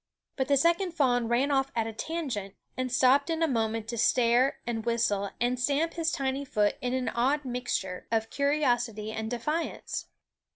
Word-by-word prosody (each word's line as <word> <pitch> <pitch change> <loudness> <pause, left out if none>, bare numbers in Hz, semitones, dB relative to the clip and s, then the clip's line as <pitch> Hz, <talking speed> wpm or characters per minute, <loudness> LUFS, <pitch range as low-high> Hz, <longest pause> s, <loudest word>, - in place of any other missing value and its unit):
But 265 -1 -1
the 280 - +4
second 340 +5 +2
fawn 245 -7 +2
ran 250 +5 +2
off 270 -1 +1
at 225 -1 +1
a 225 - -5
tangent, 240 - -4 0.2
and 255 -1 -2
stopped 265 +4 +4
in 330 0 0
a - - +4
moment 225 -4 -1
to 235 -1 -3
stare 245 +3 +3
and 230 -2 -2
whistle 220 -4 0
and 245 +1 0
stamp 290 +6 +1
his 325 -1 0
tiny 270 0 -1
foot 210 -6 +1
in 250 0 -1
an 255 -1 -1
odd 270 +5 +1
mixture 245 -7 -3
of 225 -1 0
curiosity 245 -7 0
and 220 0 -4
defiance. 300 +8 -3
250 Hz, 175 wpm, -28 LUFS, 225-280 Hz, 0.2 s, the